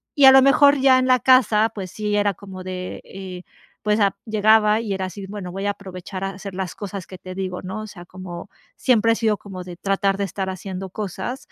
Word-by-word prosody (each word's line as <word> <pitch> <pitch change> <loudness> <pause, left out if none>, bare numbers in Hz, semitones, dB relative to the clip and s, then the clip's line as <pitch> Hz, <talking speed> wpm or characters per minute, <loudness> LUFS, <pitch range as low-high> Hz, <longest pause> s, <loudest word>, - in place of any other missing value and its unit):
y 285 -3 +6
a 265 - +11
lo 265 0 +8
mejor 280 +1 +5
ya 260 -1 +6
en 255 0 +1
la 255 -1 +5
casa, 225 -4 +4
pues 190 -4 -6
sí, 210 -1 -2
era 205 -1 +2
como 190 -1 -10
de, 185 0 -6
eh, 185 -2 -9 0.4
pues, 210 0 +1
ah, 200 -2 +2
llegaba 215 0 +4
y 220 -3 -3
era 190 -1 -2
así, 195 +1 -8
bueno, 195 -3 -6
voy 195 +2 -4
a 205 - +2
aprovechar 190 -1 -8
a 195 - -1
hacer 195 0 -8
las 190 -2 -3
cosas 200 -3 -6
que 185 - -11
te 185 +1 -9
digo, 185 -1 -4
¿no? 190 +4 -5
O 215 - -7
sea, 180 -4 -11
como 185 0 -9 0.3
siempre 230 -3 +3
he - - +3
sido 220 -2 +1
como 185 -2 -9
de 180 -1 -8
tratar 195 +1 0
de 200 - -1
estar 190 0 -3
haciendo 190 0 -6
cosas, 215 +6 -5
200 Hz, 235 wpm, -22 LUFS, 185-215 Hz, 0.4 s, a